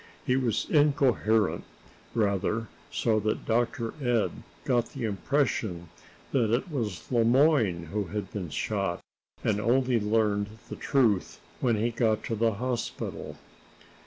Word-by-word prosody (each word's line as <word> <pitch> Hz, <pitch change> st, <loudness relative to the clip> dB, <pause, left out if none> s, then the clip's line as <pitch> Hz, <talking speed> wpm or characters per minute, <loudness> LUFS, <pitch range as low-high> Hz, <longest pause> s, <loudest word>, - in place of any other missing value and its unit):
He 125 Hz, -, +2 dB
was 125 Hz, -5 st, 0 dB
incoherent, 135 Hz, -8 st, +3 dB, 0.5 s
rather, 110 Hz, +1 st, 0 dB, 0.2 s
so 110 Hz, -2 st, +1 dB
that 110 Hz, +1 st, -2 dB
Dr. 115 Hz, 0 st, 0 dB
Ed 120 Hz, -3 st, +2 dB, 0.3 s
got 120 Hz, -2 st, +1 dB
the 130 Hz, -, -5 dB
impression 105 Hz, -, -1 dB, 0.4 s
that 120 Hz, -5 st, +2 dB
it 125 Hz, +9 st, 0 dB
was 110 Hz, -, -4 dB
Le 120 Hz, -2 st, +4 dB
Moyne 120 Hz, -, +3 dB
who 105 Hz, -1 st, 0 dB
had 105 Hz, +3 st, -5 dB
been 95 Hz, -5 st, -4 dB
shot, 95 Hz, +1 st, -1 dB, 0.4 s
and 105 Hz, -1 st, +1 dB
only 125 Hz, +1 st, +2 dB
learned 105 Hz, 0 st, 0 dB
the -, -, -5 dB
truth 115 Hz, -9 st, +1 dB, 0.2 s
when 120 Hz, -3 st, +2 dB
he 115 Hz, +3 st, 0 dB
got 110 Hz, -2 st, +1 dB
to 115 Hz, -, -2 dB
the 115 Hz, +1 st, +2 dB
hospital. 125 Hz, +3 st, -4 dB
115 Hz, 130 wpm, -28 LUFS, 105-125 Hz, 0.5 s, Le